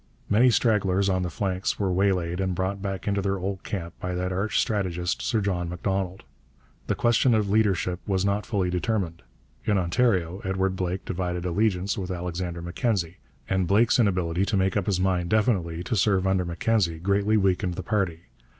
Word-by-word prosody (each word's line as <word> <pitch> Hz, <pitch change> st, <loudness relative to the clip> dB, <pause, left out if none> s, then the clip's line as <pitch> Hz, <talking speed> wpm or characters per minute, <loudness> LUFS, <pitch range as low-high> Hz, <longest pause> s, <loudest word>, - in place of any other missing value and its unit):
Many 120 Hz, +5 st, +6 dB
stragglers 100 Hz, -5 st, +2 dB
on 95 Hz, -1 st, +1 dB
the 90 Hz, -, -2 dB
flanks 95 Hz, +2 st, -2 dB
were 95 Hz, -3 st, 0 dB
waylaid 90 Hz, -2 st, +1 dB
and 95 Hz, -1 st, -1 dB
brought 95 Hz, +2 st, -2 dB
back 95 Hz, -1 st, -4 dB
into 100 Hz, -1 st, +1 dB
their 100 Hz, 0 st, 0 dB
old 95 Hz, +1 st, -4 dB
camp 85 Hz, -4 st, -5 dB
by 90 Hz, 0 st, -3 dB
that 90 Hz, +1 st, -2 dB
arch 100 Hz, +4 st, 0 dB
strategist, 90 Hz, -4 st, -1 dB
Sir 110 Hz, -, 0 dB
John 90 Hz, -4 st, -1 dB
Macdonald. 95 Hz, +1 st, -2 dB, 0.6 s
The -, -, +1 dB
question 120 Hz, +1 st, +3 dB
of 105 Hz, -2 st, 0 dB
leadership 95 Hz, -4 st, +1 dB
was 95 Hz, -1 st, +1 dB
not 100 Hz, +1 st, 0 dB
fully 95 Hz, -4 st, 0 dB
determined. 90 Hz, -3 st, -1 dB, 0.4 s
In 105 Hz, -2 st, +1 dB
Ontario 95 Hz, -2 st, +1 dB
Edward 95 Hz, 0 st, 0 dB
Blake 90 Hz, 0 st, -3 dB
divided 90 Hz, -1 st, -3 dB
allegiance 95 Hz, +1 st, 0 dB
with 95 Hz, -1 st, -4 dB
Alexander 90 Hz, -1 st, -4 dB
Mackenzie, 90 Hz, -2 st, -1 dB, 0.3 s
and 95 Hz, -2 st, 0 dB
Blake's 110 Hz, +7 st, +4 dB
inability 90 Hz, -5 st, +1 dB
to 100 Hz, 0 st, 0 dB
make 95 Hz, 0 st, +1 dB
up 100 Hz, -3 st, 0 dB
his 95 Hz, -3 st, +1 dB
mind 90 Hz, -2 st, +1 dB
definitely 95 Hz, -7 st, +1 dB
to 115 Hz, -, -2 dB
serve 95 Hz, -2 st, +2 dB
under 95 Hz, -1 st, +1 dB
Mackenzie 85 Hz, 0 st, 0 dB
greatly 100 Hz, +5 st, +2 dB
weakened 95 Hz, -2 st, +1 dB
the 95 Hz, -, -5 dB
party. 95 Hz, -6 st, -1 dB
95 Hz, 175 wpm, -26 LUFS, 90-100 Hz, 0.6 s, Many